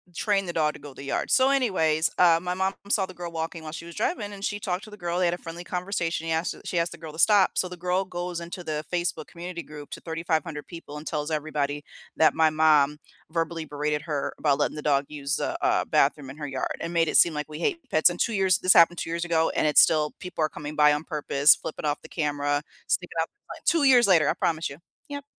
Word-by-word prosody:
train 200 0 +1
the 175 - -5
dog 155 -2 +1
to - - -12
go 145 -1 -11
the 135 - -10
yard. 140 - -2
So, 260 0 +5
anyways, 175 - +2
uh, 170 -2 +6
my 180 0 -2
mom 190 +1 0 0.2
saw 200 -2 +2
the 185 - -11
girl 175 -1 -6
walking 160 0 -5
while 155 - -7
she 165 +1 -7
was 170 - -11
driving, 210 - -2
and 200 0 -6
she 205 - -2
talked 185 -1 -3
to - - -11
the - - -9
girl, 175 -2 -3
they 185 - +2
had 170 - +2
a - - -3
friendly 170 +1 -8
conversation 175 -2 -3
he - - -1
asked 160 +2 -1
she 175 - -2
asked 170 0 -1
the - - -9
girl 160 -1 -8
to 160 - -10
stop 205 -1 +5
so 185 - +2
the 180 - -8
girl 180 +2 0
goes 175 -1 -4
into 170 +1 -7
the 155 -2 -4
Facebook 175 -1 -1
community 170 0 -7
group 150 -1 -11
to - - -7
3,500 160 -2 -3
people 165 -4 -9
and 150 - -9
tells 150 0 -3
everybody 145 -1 -2 0.3
that 160 - +4
my 160 -1 +4
mom 150 -2 +3 0.3
verbally 165 -1 -2
berated 150 0 -2
her 150 -4 -3
about 145 -3 +2
letting - - 0
the 150 - -5
dog 140 -1 +2
use 145 -1 -2
a - - -2
a - - +2
bathroom 140 -3 +1
in 135 - -10
her 150 -1 -5
yard 135 -2 -3
and 165 +1 -5
made 165 -1 +2
it - - +3
seem 170 - +6
like 150 0 -4
we 150 - -7
hate 335 - 0
pets, 155 +3 +4
and 175 - -8
2 230 - +1
years 190 -4 +3
this 185 - +5
happened 170 0 +6
2 - - -4
years 170 +1 -2
ago, 165 -1 +2
and - - +1
it's 150 - +7
still, 150 -2 +3
people 180 -3 -3
are 155 - +1
coming 150 0 -7
by 150 0 +5
on 150 +1 -2
purpose, 145 -2 +4
flipping 155 - -7
off 145 0 -1
the - - -12
camera, 145 -2 -1 0.3
sticking 180 -2 -1
off 165 - -1 0.2
the - - -6
f - - -20
2 335 -3 +3
years 250 -4 +6
later, 165 -6 +4
I - - +2
promise 165 0 -1
you. 140 - -10 0.3
Yep. 285 0 -6
165 Hz, 260 wpm, -26 LUFS, 150-180 Hz, 0.3 s, it's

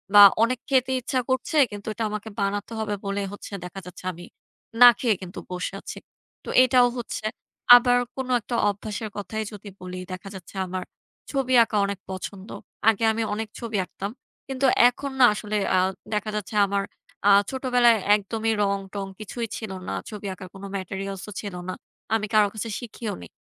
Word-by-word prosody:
না 205 - +11 0.2
অনেক 245 +1 +1
খেতে 260 -1 +3
ইচ্ছা 260 +1 -1
করছে 260 +4 -1 0.2
কিন্তু 205 +1 -8
এটা 230 - -3
আমাকে 210 +1 -5
বানাতে 200 +2 -1
হবে 210 -1 -2
বলেই 200 0 -2
হচ্ছে 205 - -9
দেখা 185 +2 -7
যাচ্ছে 180 0 -11
আমি 175 +1 -11 0.6
না 245 - +13
খেয়েই 225 -6 +2
কিন্তু 185 +1 -7
বসে 180 +1 -3
আছি। - - -8 0.5
তো - - -8
এটাও 250 -1 +5
হচ্ছে 235 -2 -5 0.5
আবার 245 0 +5 0.2
কোন 265 -1 -4
একটা 235 +2 -4
অভ্যাস 205 +1 -4 0.2
কথাই 215 +2 -3
যদি 205 -1 -9
বলি, 185 0 -6
দেখা 185 +2 -7
যাচ্ছে 190 +1 -11
আমার 185 0 -4 0.5
ছবি 265 -2 0
আঁকা 220 -2 -2
অনেক 200 -1 -4
পছন্দ। 190 +2 -7 0.4
আগে 225 0 +1
আমি 225 +1 -1
অনেক 220 +1 -3
ছবি 230 -3 -3
আঁকতাম। 200 +3 -6 0.4
কিন্তু 270 0 -1 0.2
এখন 275 +2 -6
না 255 - +9
আসলে 210 0 -4 0.2
আ - - +4 0.4
দেখা 210 0 -1
যাচ্ছে 210 +1 -4
আমার 200 0 0 0.4
আ - - +7 0.2
ছোটবেলায় 250 -3 +3 0.2
একদমই 220 +2 -1
রং 200 0 +1 0.2
টং 200 -1 -3
কিছুই 230 +3 -4
ছিল 220 -4 -6 0.2
না। - - -2 0.2
ছবি 210 -2 -6
আঁকার 185 0 -10
কোনো 200 +1 -8
ম্যাটেরিয়ালস 195 0 -5
ও - - -8
ছিল 200 -4 -6
না। - - -2 0.4
আমি 215 - 0
কারো 210 -1 +6
কাছে 225 +1 -4
শিখিও 230 -2 -5
নেই। 85 - -10
210 Hz, 180 wpm, -25 LUFS, 195-235 Hz, 0.6 s, না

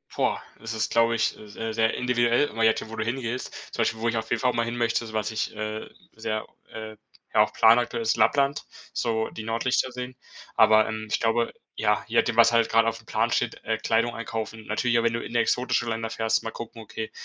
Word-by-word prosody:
Boah, - - 0 0.2
das 115 +1 -5
ist, 110 - -1
glaub 115 0 +4
ich, 115 -1 0
äh, 105 - -12
se 110 +2 -5
sehr 115 0 +2
individuell 120 +2 +2
immer 115 +1 -2
jetzt 110 0 +4
schon, - - -8
wo - - -6
du 110 - -1
hingehst. 120 +1 -3 0.3
Zum - - -1
Beispiel, 110 - 0
wo 115 - -1
ich 115 - -1
auf 110 0 -3
jeden 120 - +1
Fall 125 -1 +2
mal 115 - +1
hin 120 +1 -4
möchte, 120 0 +1
so 110 - -9
was 110 0 -1
ich, 110 0 -3
äh, 110 0 -4 0.3
sehr, 110 -1 -3 0.2
äh 110 -1 -8 0.4
ja - - +7
auch - - +2
planaktuell 115 0 +4
ist 110 - +2
Lappland, 140 +6 +2 0.3
so 110 -2 0
die 110 - -7
Nordlichter 120 +3 0
sehen. 125 0 -6 0.4
Aber, 110 0 +6
ähm, 110 0 -4
ich - - +1
glaube 115 +1 +1 0.2
ja, 105 -1 +1
je 115 - -1
nachdem, 120 - +3
was 115 0 +7
halt 115 -1 +3
grad 115 0 +4
auf 115 0 0
dem 110 - -20
Plan - - +1
steht, - - 0
äh, 110 -1 -1
Kleidung 115 +2 +1
einkaufen. 115 -1 -5
Natürlich 120 +2 +1
auch, - - 0
wenn 115 - +2
du 115 - -2
in - - -8
exotische 120 +1 +1
Länder 115 0 -3
fährst, 110 -1 0
mal 115 - -4
gucken: 115 0 -8
„Okay, 110 0 -6
115 Hz, 235 wpm, -26 LUFS, 110-120 Hz, 0.4 s, ja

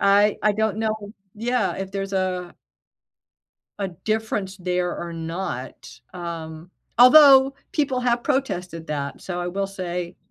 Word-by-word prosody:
I 200 +1 +4
I 210 - +4
don't 220 0 0
know 220 -1 0 0.4
yeah, 245 +4 0
if 190 0 -5
there's 195 0 -4
a 185 -2 -2 1.2
a 200 -1 -2
difference 210 +1 -3
there, 180 -1 -1
or 170 0 -5
not, 160 -8 -6
um, 165 -1 -7 0.3
although 270 +1 +8 0.2
people 275 -4 0
have 240 -1 +1
protested 180 - -2
that. 140 -2 -4
So, 180 -1 -4
I 175 - -2
will 195 +2 -2
say, 180 -3 -5
190 Hz, 135 wpm, -23 LUFS, 175-220 Hz, 1.2 s, although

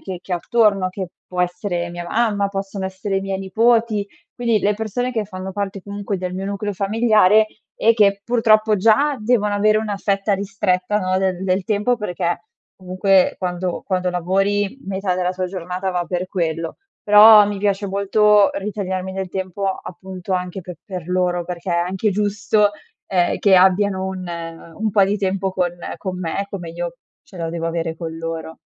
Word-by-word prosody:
che 185 -2 -6
che 190 - -6
ho - - +1
attorno, 200 -1 +2
che 185 -1 -5 0.2
può 180 -1 -3
essere 180 -1 -2
mia 175 0 -6
mamma, 210 -3 +1
possono 195 0 -4
essere 190 +1 -3
i - - +1
miei 195 -1 -3
nipoti; 220 +2 +2 0.3
quindi 235 -3 +1
le 205 0 +1
persone 225 +4 -2
che 220 -3 -1
fanno 190 -1 -7
parte 200 0 -4
comunque 200 0 -4
del 180 0 -4
mio 190 +1 -4
nucleo 200 +1 -3
familiare 215 +1 +4 0.3
e 230 +1 +3
che 200 -2 +3
purtroppo, 215 -2 +3
già 225 +9 +3
devono 215 -2 +1
avere 215 +1 +3
una 215 -2 -3
fetta 200 +1 0
ristretta 195 0 0
no, 185 -2 0
del 190 -1 0
del 185 0 0
tempo 210 +4 +1
perché 175 -5 -2 0.3
comunque 185 0 +2
quando 180 -1 -3
quando 185 -2 0
lavori 195 +5 0
metà 190 -1 -1
della 180 0 0
tua 185 0 -3
giornata 180 +1 -4
va 180 -1 -1
per 180 +1 -3
quello, 165 -3 -2 0.3
però 210 0 +8
mi 205 0 -3
piace 200 0 0
molto 200 +1 +4
ritagliarmi 190 -2 -4
del 190 -1 -4
tempo 190 +1 -3
appunto 185 0 -6
anche 180 +1 -3
pe 180 -1 -9
per 180 -3 -7
loro 180 -1 0
perché 180 +1 -5
è - - +2
anche 185 +5 0
giusto, 205 +1 +1 0.4
ehm, 180 -2 +1
che 200 -2 +4
abbiano 190 +1 +3
un 190 -1 -5 0.5
un 220 0 0
po' 200 -1 +4
di 200 +2 -1
tempo 195 -1 -1
con 180 -2 0 0.3
con 185 0 -4
me, 185 +3 -2
come 180 -4 -6
io 175 +6 -5 0.3
ce 290 -11 -16
lo 165 -2 -3
devo 165 0 -3
avere 165 -1 -2
con 160 -1 -6
loro. 165 0 -5
195 Hz, 180 wpm, -20 LUFS, 180-205 Hz, 0.5 s, però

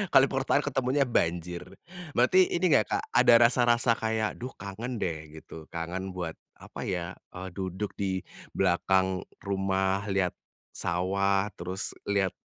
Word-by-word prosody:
kalo 135 - +9
perkotaan, 135 +2 +1
ketemunya 135 0 +1
banjir. 85 -7 0 0.6
Berarti 180 +10 +5
ini 175 -1 +1
nggak 110 -8 +4
Kak, - - -1
ada - - +6
rasa-rasa 120 0 +4
kayak, 110 -1 -1
duh 125 +2 -6
kangen 110 +6 -5
deh 80 -3 -4
gitu? 80 0 -11
Kangen 90 +3 -5
buat 85 -3 -3 0.2
apa - - -8
ya, 90 -2 -2 0.2
eee, 95 +1 -6
duduk 95 +2 -4
di 95 -2 -1 0.3
belakang 95 0 +2 0.2
rumah, 95 0 0
lihat 95 -3 +1 0.4
sawah, 95 +3 0
terus 90 +3 -3 0.2
lihat, 100 -2 +2
95 Hz, 135 wpm, -28 LUFS, 90-115 Hz, 0.6 s, kalo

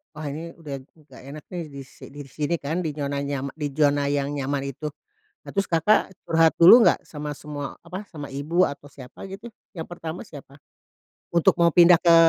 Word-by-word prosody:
"Wah 155 - -7
ini, 165 +3 -7
udah 145 -5 -7
nggak 150 +2 -18
enak 150 +2 -9
nih, 175 -2 -4
di 140 -1 -9
si 130 - -14
di 145 0 -8
sini 150 +4 -2
kan" 155 +5 -2
di 155 -3 -3
nyona 140 -1 -2
nya 140 -1 -3
di 150 -2 -3
zona 145 -1 +2
yang 140 0 0
nyaman 140 -1 -2
itu. 150 +4 -6 0.6
Nah, - - -9
terus 195 -1 -1
Kakak 185 +3 +2
curhat 165 0 +3
dulu 180 +8 +9
nggak - - +2
sama 150 -1 -6
semua, 145 -1 -7
apa, 195 +3 -8
sama 145 -4 -9
ibu, 155 +6 +1
atau 145 0 -3
siapa 135 +5 -11
gitu, 205 +5 -9 0.2
yang 165 - -4
pertama 170 0 -7
siapa? 145 - -13 0.8
Untuk 170 -1 +4
mau 170 0 +5
pindah 175 +1 +7
ke 170 -1 +6
150 Hz, 195 wpm, -24 LUFS, 140-170 Hz, 0.8 s, dulu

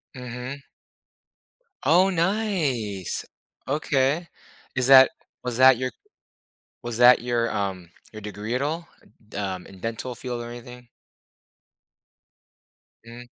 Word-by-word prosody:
Mhm. 125 +2 -7 1.2
Oh, 180 +4 +5
nice. 165 - -1 0.4
Okay. 145 +2 +1 0.5
Is 125 0 +1
that 130 -1 +9 0.3
was 125 -2 -3
that 130 0 +8
your 130 +1 -2 0.9
was 120 -3 -5
that 125 0 +7
your, 120 -1 0
um, 95 -4 -3 0.2
your 110 - -9
degree 105 +3 -5
at 130 - -1
all 160 +4 -2 0.4
d - - -8
um, 95 -3 -3
in 95 -1 -14
dental 115 +4 -4
field 120 0 -5
or 120 - -7
anything? 125 +1 -11 2.2
Mm. 120 +1 -11
125 Hz, 110 wpm, -25 LUFS, 115-135 Hz, 2.2 s, that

